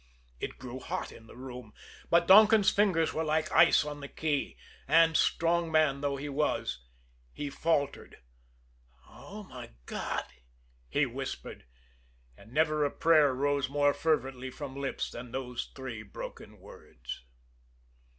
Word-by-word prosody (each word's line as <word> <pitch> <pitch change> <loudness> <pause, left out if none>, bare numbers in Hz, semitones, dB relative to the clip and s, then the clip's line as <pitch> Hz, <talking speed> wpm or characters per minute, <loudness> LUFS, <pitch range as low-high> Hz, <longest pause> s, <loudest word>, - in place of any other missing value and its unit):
It - - -5
grew 125 0 -7
hot - - -4
in 115 - -14
the - - -14
room; 125 -3 -9 0.3
but 170 0 +4
Donkin's 210 +1 +7
fingers 185 -6 +2
were 160 - -1
like 155 0 0
ice - - +6
on 145 -1 -6
the 140 - -7
key, 150 -1 -2 0.3
and, 165 -1 +5
strong 170 +1 +2
man 155 -3 +3
though 140 -1 0
he 145 +2 -5
was, 140 - -1 0.5
he 145 -1 -5
faltered. 145 -2 -1 0.9
"Oh, 210 +1 -11
my 185 - -10
God!" - - -3 0.6
he - - +2
whispered - - -6 0.7
and 110 - -17
never 155 +1 +2
a 145 - +2
prayer 155 -3 +4
rose 140 0 0
more 145 0 +3
fervently 135 -4 -1
from 135 0 -8
lips 140 -1 -3
than 120 0 -8
those 125 -1 -5
three 130 -5 -6
broken 105 - -9
words. - - -10
145 Hz, 140 wpm, -30 LUFS, 130-160 Hz, 0.9 s, Donkin's